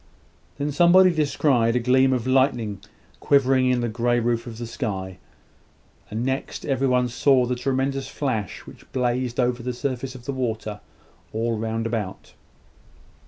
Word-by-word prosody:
Then 145 +1 -2
somebody 180 +4 +6
descried 140 -7 +2
a - - +3
gleam 130 +2 +3
of 125 -3 0
lightning 125 -6 +1 0.4
quivering 130 -2 +3
in 125 -1 +2
the 120 - 0
grey 120 +2 +1
roof 120 +1 -1
of 115 -2 -8
the 120 - -5
sky; 95 -6 -4 0.9
and 110 +3 -3
next, 135 +1 -3
every 135 -1 +1
one 125 -1 +2
saw 125 +1 +3
the 125 +1 -1
tremendous 135 +2 -1
flash 115 - -3
which - - -15
blazed 125 -1 -1
over 125 -1 +1
the 125 +1 -3
surface 130 +1 -4
of 125 -1 -11
the 140 - -3
water, 110 -5 -3 0.5
all 115 +1 -1
round 115 +1 -2
about. 110 -5 -4
125 Hz, 155 wpm, -24 LUFS, 115-135 Hz, 0.9 s, somebody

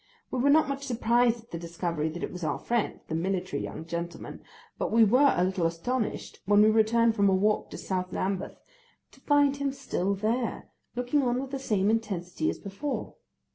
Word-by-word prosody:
We 255 - -1
were 275 +3 +3
not 310 +2 +5
much 275 0 -3
surprised 240 -1 +2
at 230 - -28
the 170 - -4
discovery 170 -2 -2
that 170 +2 -6
it - - -3
was 180 -1 -7
our 155 - 0
friend, 235 -2 -1
the - - -5
military 180 -2 -1
young 160 - -6
gentleman, 170 +1 -6 0.4
but - - -1
we 225 +1 +6
were 255 +7 +5
a 175 - +3
little 185 -2 +1
astonished 215 +8 -3
when 205 +1 +6
we 215 - +6
returned 225 +1 +3
from 200 -2 +4
a 190 - +4
walk 210 +3 +1
to - - -8
South 185 -1 -3
Lambeth 190 0 -3 0.5
to - - -19
find 285 -1 +3
him 280 -1 -1
still 200 -8 -2
there, 225 +4 -2 0.3
looking 245 +4 +1
on 250 -1 +1
with 270 0 -5
the 275 - -3
same 210 -5 +1
intensity 215 - -1
as - - -3
before. 210 +9 -5
215 Hz, 200 wpm, -28 LUFS, 185-250 Hz, 0.5 s, we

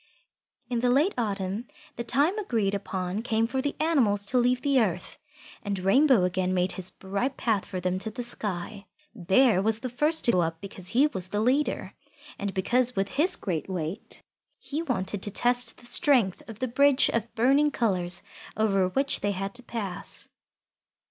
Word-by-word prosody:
In 240 -1 -1
the 245 +1 +1
late 290 +10 +3
autumn, 205 -1 -3 0.3
the 235 - -4
time 285 - +1
agreed 225 - -1
upon 190 0 -3
came 225 -1 0
for 260 +3 -2
the 285 +1 -3
animals 245 -11 +2
to 250 +5 +1
leave 250 +1 +1
the 280 -2 +3
earth, 180 -4 -3 0.4
and 205 -3 -3
Rainbow 220 +4 +4
again 185 +1 0
made 180 +1 +1
his 185 -1 -5
bright 200 +8 -3
path 220 -5 0
for 185 - -4
them 180 +1 -1
to 220 - -2
the 245 +3 -6
sky. 205 -3 -4 0.3
Bear 195 +1 +3
was 220 +2 +2
the 255 - -4
first 300 +6 +1
to 235 - +6
go 180 - +4
up 165 -1 -2
because 185 -1 -8
he 260 +7 +4
was 190 -12 -3
the 205 +2 -2
leader, 260 +7 0 0.5
and 200 0 -2
because 245 +6 +2
with 195 0 -1
his 340 +7 +3
great 175 -3 -4
weight 180 +2 -5 0.3
he 295 +3 -5
wanted 205 - -2
to 205 - -4
test 245 +3 +2
the - - -15
strength 240 - +4
of 220 - -8
the 255 - -2
bridge 280 +3 +4
of 230 0 -3
burning 275 +6 +3
colours 185 -9 0 0.3
over 195 -4 +2
which 270 +9 0
they 205 0 -1
had 195 +1 -4
to 250 - -10
pass. 200 -7 -5
220 Hz, 180 wpm, -27 LUFS, 190-255 Hz, 0.5 s, to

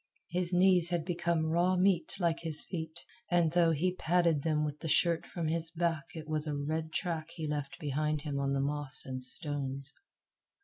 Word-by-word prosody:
His 175 0 0
knees 180 -1 +4
had 170 -3 -1
become 170 -2 0
raw 175 +3 +2
meat 180 -3 +2
like 170 -2 +1
his 160 -2 +3
feet, 160 -1 -6 0.3
and 175 -3 +3
though 170 0 +4
he 170 +3 +1
padded 170 -4 +2
them 150 0 +1
with 150 0 -5
the 165 - -5
shirt 170 +2 +2
from 170 -3 -3
his 165 +1 0
back 165 -3 -1
it 160 -1 -7
was 155 0 0
a 145 -1 -2
red 160 +2 -2
track 160 -2 -2
he 160 - -4
left 145 -1 -3
behind 150 0 -1
him 145 -3 -3
on 140 0 0
the 135 - +1
moss 145 -1 0
and 130 -1 -4
stones. 140 +1 -1
160 Hz, 190 wpm, -31 LUFS, 150-170 Hz, 0.3 s, knees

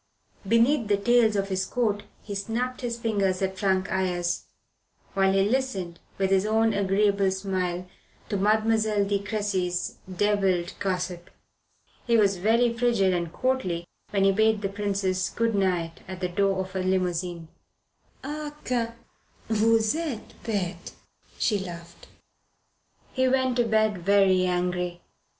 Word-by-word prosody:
Beneath 230 +3 +3
the 205 -1 +3
tails 230 +1 +3
of 195 0 -1
his 190 0 0
coat 210 0 0 0.2
he 205 - -6
snapped 230 +5 -3
his 235 -2 -3
fingers 200 -5 0
at 190 0 -2
Frank 190 -2 +1
Ayres, 175 -2 -1 0.7
while 195 0 +3
he 195 0 +3
listened, 210 -9 -2 0.2
with 195 0 0
his 190 -1 +4
own 220 +1 +2
agreeable 200 0 +2
smile, 185 -2 -2 0.4
to 210 - -2
Mademoiselle 215 0 +2
de 200 0 0
Cressy's 200 -4 -2
devilled 190 -2 +1
gossip. 180 -2 -3 0.8
He 235 -1 +4
was 200 -3 +3
very 230 +5 +2
frigid 230 -6 +2
and 170 -2 -2
courtly 185 -9 -1 0.2
when 195 -1 +1
he 195 - +5
bade 220 +1 +2
the 195 - 0
Princess 195 -2 -1
good 230 0 0
night 180 -4 0
at 185 0 -7
the 180 -1 -2
door 195 +1 +1
of 190 0 -4
her 190 -1 -2
limousine. 180 -2 -1 0.7
"Ah, 295 +1 -5
que 235 -2 -1 0.6
vous 220 +1 +3
etes 310 -9 -4
bete!" 200 -5 -3 0.4
she 210 -4 +1
laughed. 170 -2 -9 1.1
He 260 -1 +2
went 260 -1 +2
to 240 - +3
bed 215 -3 +2
very 190 0 +4
angry. 180 -1 -1
200 Hz, 140 wpm, -26 LUFS, 185-225 Hz, 1.1 s, he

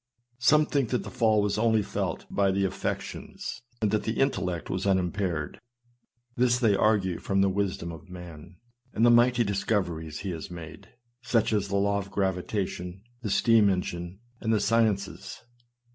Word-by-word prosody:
Some 150 +5 +5
think 140 -6 0
that 125 - 0
the - - -8
fall 110 -2 +3
was 105 +1 0
only 110 -1 +3
felt - - -3
by 100 -1 +2
the 95 +1 +1
affections, 95 - -4 0.2
and 105 - +2
that 110 - +1
the 110 - -3
intellect 95 -11 0
was 95 +1 -2
unimpaired; 90 -4 -1 0.8
this 120 0 +3
they 115 -5 +3
argue 95 -3 +2
from 95 0 0
the 100 - +4
wisdom 95 -3 -2
of 85 +4 -11
man, 90 -1 -10 0.4
and 115 - +3
the 120 - +7
mighty 120 0 +5
discoveries 90 -7 -2
he 95 -1 -3
has 80 -2 -6
made, 85 -2 -10 0.3
such 115 -3 +1
as 100 -2 +1
the 100 - -2
law 100 +1 +2
of 100 0 -7
gravitation, 95 -1 -2 0.2
the 110 - -3
steam 110 0 +4
engine, 90 -1 -3 0.2
and 110 - -1
the 110 - +3
sciences. 100 -4 0
100 Hz, 165 wpm, -27 LUFS, 90-110 Hz, 0.8 s, the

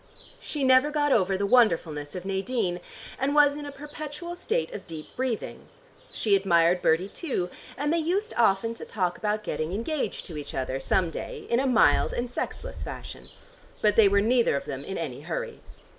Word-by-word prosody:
She 295 -3 -3
never 260 +2 +5
got 295 -1 +1
over 195 -5 +3
the 200 - 0
wonderfulness 165 -10 +2
of 180 0 -6
Nadine 195 -1 -1 0.4
and 280 +2 0
was 290 -1 +6
in 295 0 -6
a - - -6
perpetual 300 +4 -7
state 475 +7 -2
of - - -8
deep 160 -3 -9
breathing. 255 -4 -3 0.4
She 210 -3 +2
admired 175 -2 +3
Bertie 165 +4 +3
too, 195 - -3 0.3
and 295 +3 0
they 335 - +2
used 380 +7 -1
often 225 0 +3
to - - -9
talk 180 -4 -1
about 210 0 -1
getting 155 -3 -3
engaged 265 +8 -2
to 165 -5 -7
each 145 - -7
other 130 0 -2
some 170 +5 +1
day, - - -6
in 235 - +4
a 270 - +1
mild 220 - +4
and 245 0 -3
sexless - - -4
fashion. - - -8 0.5
But 210 -1 +4
they 220 -3 +7
were 200 +1 +4
neither 235 - +3
of 140 - -3
them 135 0 -5
in 195 - -5
any - - -4
hurry. - - -4
225 Hz, 190 wpm, -27 LUFS, 180-290 Hz, 0.5 s, they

